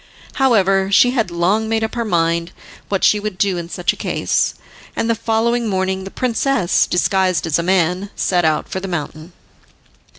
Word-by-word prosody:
However 195 -6 +3
she 245 +5 +5
had 225 -7 0
long 190 +6 0
made 225 0 0
up 220 - -3
her 235 - -2
mind 170 -3 0 0.4
what 195 -2 -1
she 210 - +4
would 205 -2 -5
do 190 -3 0
in 170 0 -7
such 180 0 -1
a - - -11
case, - - -1 0.4
and 225 - -1
the 230 - +2
following 230 +1 0
morning 190 0 -1
the - - -6
princess, 245 -5 +1
disguised 185 -2 +1
as 165 0 0
a - - +1
man, 180 +2 0
set 180 -2 +1
out 155 -1 +1
for 190 - -4
the 195 - -6
mountain. 155 -1 -5
190 Hz, 185 wpm, -18 LUFS, 175-220 Hz, 0.4 s, she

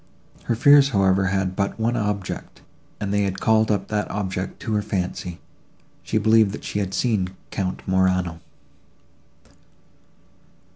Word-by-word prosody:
Her 115 - 0
fears, 140 +3 +6
however, 95 -4 +2
had 95 -1 -1
but 100 +3 -2
one 115 +2 +1
object, 105 -4 -3 0.4
and 100 -1 -2
they 105 - +2
had 95 -1 -1
called 110 -1 +3
up 105 -3 -1
that 105 -1 -1
object 95 -2 -4
to 110 - -3
her 105 - +2
fancy:—she 90 0 -6
believed 110 -1 +4
that - - -7
she 105 - -3
had 95 -2 -2
seen 95 -5 0 0.2
Count 95 -2 -3
Morano. 95 -3 +1
100 Hz, 135 wpm, -23 LUFS, 95-110 Hz, 0.4 s, fears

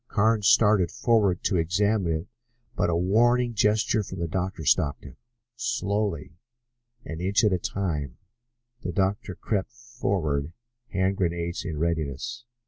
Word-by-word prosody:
Carnes 110 -2 +2
started 105 -6 +5
forward 105 -5 +1
to 95 - +1
examine 95 +2 +1
it, - - -15 0.5
but - - +1
a 85 - +1
warning 120 +7 +3
gesture 105 0 +2
from 95 -2 -7
the 85 -1 -2
doctor 90 -1 -3
stopped 70 0 +2
him. - - -11 0.4
Slowly, 100 -7 -2 0.7
an 80 +1 -6
inch 100 +5 +2
at 105 -3 +4
a 90 - +1
time, 75 -9 -3 0.6
the 90 - -3
doctor 95 +1 -1
crept 105 +1 -2
forward, 95 - -2 0.4
hand 95 0 0
grenades 85 -1 -2
in 80 -6 -4
readiness. 85 - -2
95 Hz, 135 wpm, -26 LUFS, 85-105 Hz, 0.7 s, started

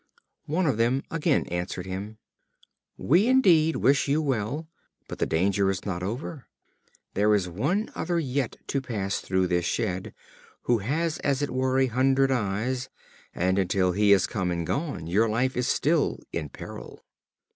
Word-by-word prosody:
One 170 +5 0
of 135 -8 +1
them 120 +4 +1
again 165 -1 +1
answered 90 +1 -3
him: 100 +3 -6 0.8
"We 180 - +3
indeed 175 - +4
wish 140 +2 +3
you 145 +3 +2
well, 140 +1 -2 0.4
but - - -8
the - - +1
danger 95 +4 +2
is 95 -2 -3
not 90 -3 -3
over. 120 - -5 0.7
There 105 +2 +3
is 95 -3 0
one 145 - -1
other 175 -1 -1
yet 135 -4 -2
to 140 - 0
pass 105 -6 -2
through 95 0 0
the 90 -1 +1
shed, 95 +1 -2 0.5
who 120 -2 +2
has 155 +10 -1
as 140 0 0
it 145 - -2
were 130 0 0
a 135 - +4
hundred 135 +2 +2
eyes, 125 +2 -1 0.5
and, 95 +2 +1
until 95 0 +2
he 105 +3 +2
has 100 -2 +6
come 95 -5 -2
and 85 -1 -2
gone, 140 - -3
your 105 +7 +2
life 125 +4 0
is 125 0 0
still 155 +1 +1 0.2
in 75 -3 -3
peril." - - -10
120 Hz, 165 wpm, -26 LUFS, 95-140 Hz, 0.8 s, has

